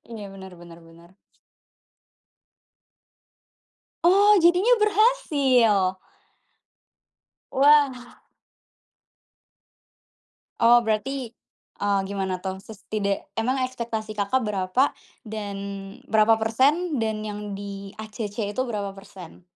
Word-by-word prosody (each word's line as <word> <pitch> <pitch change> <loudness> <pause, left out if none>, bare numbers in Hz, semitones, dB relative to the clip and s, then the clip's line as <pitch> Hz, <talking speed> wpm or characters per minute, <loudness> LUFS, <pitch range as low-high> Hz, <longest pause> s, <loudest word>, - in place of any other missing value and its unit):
Iya, 210 -3 -7
bener 190 -1 -11
bener 170 -1 -13
bener. 170 +1 -18 2.9
Oh, 405 +4 +6
jadinya 365 +8 +5
berhasil? 270 - +3 1.6
Wah! 275 -3 +3 2.4
Oh 235 +1 +6
berarti, 240 +3 -2 0.6
eee, 200 -1 +2
gimana 190 -2 -3
tuh 190 0 -4
ses 215 -2 -12
tida 200 -2 -1 0.2
emang 255 +4 0
ekspektasi, 230 -4 -5
Kakak, 205 +6 0
berapa 210 +5 +1 0.3
dan 210 -3 -6 0.5
berapa 220 0 +4
persen 280 +9 +1
dan 220 -2 -2
yang 210 0 -6
di-ACC 205 +1 -6
itu 255 - +1
berapa 205 -5 -4
persen? 185 -3 -13
220 Hz, 85 wpm, -24 LUFS, 200-260 Hz, 2.9 s, Oh